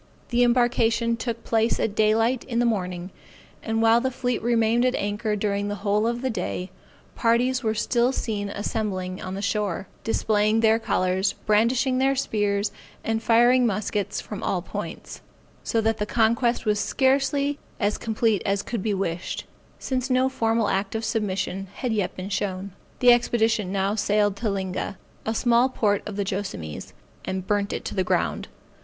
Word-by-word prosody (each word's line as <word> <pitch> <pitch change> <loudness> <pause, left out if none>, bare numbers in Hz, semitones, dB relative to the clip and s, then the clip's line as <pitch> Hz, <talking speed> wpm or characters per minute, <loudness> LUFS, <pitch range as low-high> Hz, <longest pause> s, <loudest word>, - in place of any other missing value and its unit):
The 245 0 +2
embarkation 235 -1 +2
took 230 0 -4
place 225 0 +1
at 205 - 0
daylight 225 +4 +2
in 235 -3 -3
the 240 - +3
morning; 180 -5 -2 0.5
and 225 0 -1
while 225 +1 +5
the 260 - 0
fleet 250 -1 -2
remained 235 0 +2
at 255 0 +2
anchor 210 +1 -1
during 205 0 -1
the 205 - -2
whole 210 +2 +2
of 240 +2 -2
the 260 - +1
day, 185 -2 -4 0.4
parties 245 +2 +2
were 220 -3 0
still 240 +3 +2
seen 210 -6 -3
assembling 200 -3 -3
on 185 0 -5
the 200 - -5
shore, 200 -2 -1 0.2
displaying 215 -1 +2
their 225 0 +4
colors, 190 -2 +1
brandishing 245 +5 +2
their 270 +1 +3
spears, 205 -5 0 0.3
and 225 0 -1
firing 240 +2 +5
muskets 210 -1 -2
from - - -7
all - - -1
points; - - -7 0.4
so 230 - 0
that 225 0 0
the 210 - -1
conquest 235 +2 +2
was 210 -1 +2
scarcely 280 +3 +1 0.2
as 205 0 0
complete 220 -2 +1
as 200 0 0
could 235 -4 -3
be 210 0 0
wished, 180 -2 -3 0.3
since 260 0 -2
no 255 +1 +3
formal 225 -3 +1
act 195 +2 -1
of 225 0 -2
submission 195 -3 -2
had 250 -4 -2
yet 205 -4 -1
been 185 +1 -6
shown. 195 0 -2 0.3
The 245 -1 +8
expedition 225 -4 +1
now 195 +1 0
sailed 205 -1 +1
to 220 0 -1
Linga, 190 0 -3 0.3
a 220 - 0
small 240 +2 +3
port 205 -5 +1
of 210 - -5
the 200 -1 -1
Joassamees, 190 - -5 0.3
and 190 -1 -3
burnt 205 0 0
it - - -4
to - - -4
the 190 - +1
ground. 85 - 0
220 Hz, 170 wpm, -25 LUFS, 200-235 Hz, 0.5 s, The